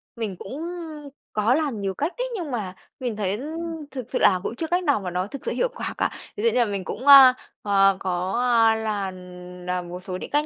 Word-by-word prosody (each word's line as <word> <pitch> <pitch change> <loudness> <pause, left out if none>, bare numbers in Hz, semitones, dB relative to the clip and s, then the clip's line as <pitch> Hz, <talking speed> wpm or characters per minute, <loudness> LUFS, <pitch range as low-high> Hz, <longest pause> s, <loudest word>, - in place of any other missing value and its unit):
Mình 220 -5 -4
cũng 270 +10 -7 0.7
có 215 +3 +2
làm 285 -9 -1
nhiều 195 -1 -1
cách 300 - -2
đấy, - - -1
nhưng 340 -8 -4
mà 200 -7 -4 0.2
mình 245 -4 -3
thấy 205 0 -2 0.5
thực 260 -3 -5
sự 255 - 0
là 185 - +5
cũng 235 - -3
chưa 325 +6 -3
cách 355 +3 +1
nào 285 -8 +2
mà 185 -3 -5
nó 180 +2 -1
thực 275 +5 -9
sự - - -1
hiệu - - 0
quả - - -4
cả. - - +1 0.3
Ví 415 - -3
dụ 465 - +5
như 250 - +1
là 240 - +4
mình 200 -3 -3
cũng, 250 +8 -6
a, 270 -2 +10 0.3
ờ, 195 -1 +4
có, 180 0 -2 0.3
a, 225 0 +5
là 210 -3 -2 0.5
làm 180 -1 -3
một 180 +1 -7
số 185 -1 -4
những - - -7
cách 295 +1 +1
215 Hz, 235 wpm, -24 LUFS, 190-275 Hz, 0.7 s, a